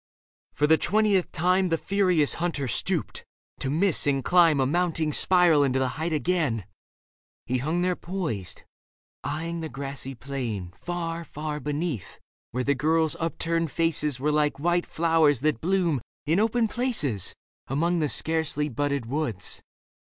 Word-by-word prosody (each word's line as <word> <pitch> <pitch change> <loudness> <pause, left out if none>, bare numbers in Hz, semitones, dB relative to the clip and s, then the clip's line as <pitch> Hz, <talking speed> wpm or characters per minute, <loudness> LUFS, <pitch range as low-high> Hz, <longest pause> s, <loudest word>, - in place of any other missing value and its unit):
For 150 - +2
the 160 +1 +4
twentieth 205 0 +2
time 180 +2 +2
The 165 - +1
furious 180 -6 +2
hunter 155 -6 -1
stooped, 120 - -1 0.4
to 135 - -2
miss 165 +2 +2
and 135 -2 +1
climb 170 -5 +5
A 135 - +3
mounting 165 0 0
spiral 175 -5 +4
into 135 -1 +1
the 130 -1 +1
height 160 +6 -3
again. 155 - 0 0.8
He 125 +1 -1
hung 160 +7 0
there 180 0 +1
poised, 170 - -4 0.6
eyeing 165 +2 -3
the 160 -1 -4
grassy 135 -1 -5
plain 115 -9 -5
Far, 170 +3 -4
far 150 0 -5
beneath, 150 - -4 0.3
where 125 +2 -2
the 140 - +2
girls' 155 +3 +1
upturned 165 0 -1
faces 150 -4 0
Were 150 +3 +1
like 150 -1 +1
white 175 +4 +1
flowers 160 -5 +2
that 150 -6 0
bloom 175 -6 +1 0.2
in 160 +5 +2
open 225 +1 +2
places 210 - -1 0.3
Among 170 +6 +1
the 150 -2 +1
scarcely 160 -2 +1
budded 140 0 -1
woods. 125 -6 -3
155 Hz, 145 wpm, -26 LUFS, 140-175 Hz, 0.8 s, climb